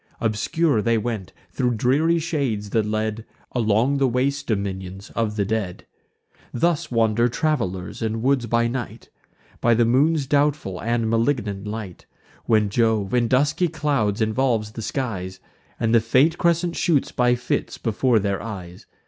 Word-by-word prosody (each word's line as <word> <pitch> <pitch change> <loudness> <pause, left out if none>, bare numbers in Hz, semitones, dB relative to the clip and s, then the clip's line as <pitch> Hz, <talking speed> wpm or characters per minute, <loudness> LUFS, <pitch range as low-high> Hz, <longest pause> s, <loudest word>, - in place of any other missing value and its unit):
Obscure 115 +5 +1
they 115 +1 +2
went 110 -4 -3 0.2
thro' 125 -2 0
dreary 135 +9 +2
shades, 135 -11 -2
that 110 -2 +1
led 110 +1 -2 0.3
Along 120 +4 +1
the 135 - +3
waste 140 +3 -1
dominions 95 -2 -4
of 110 -2 -1
the 100 -2 0
dead. 100 -4 -3 0.7
Thus 165 +5 0
wander 115 0 +2
travelers 115 - -2
in 110 0 -2
woods 130 -2 +2
by 115 +1 +2
night, 120 0 -6 0.5
By 120 0 +3
the 120 +1 +3
moon's 140 +5 +2
doubtful 140 - 0
and 115 0 0
malignant 115 -4 0
light, 105 -4 -7 0.4
When 110 -2 +3
Jove 110 -2 +1
in 120 -1 +3
dusky 145 +8 +2
clouds 140 -10 -1
involves 110 -1 +1
the 115 - -7
skies, 95 -8 -4 0.4
And 115 0 +1
the 115 - +5
faint 135 +9 +3
crescent 170 0 +1
shoots 155 -6 +1
by 125 0 +2
fits 125 +1 -2
before 115 +1 +1
their 100 -2 -1
eyes. 95 -5 -8
115 Hz, 150 wpm, -23 LUFS, 105-135 Hz, 0.7 s, the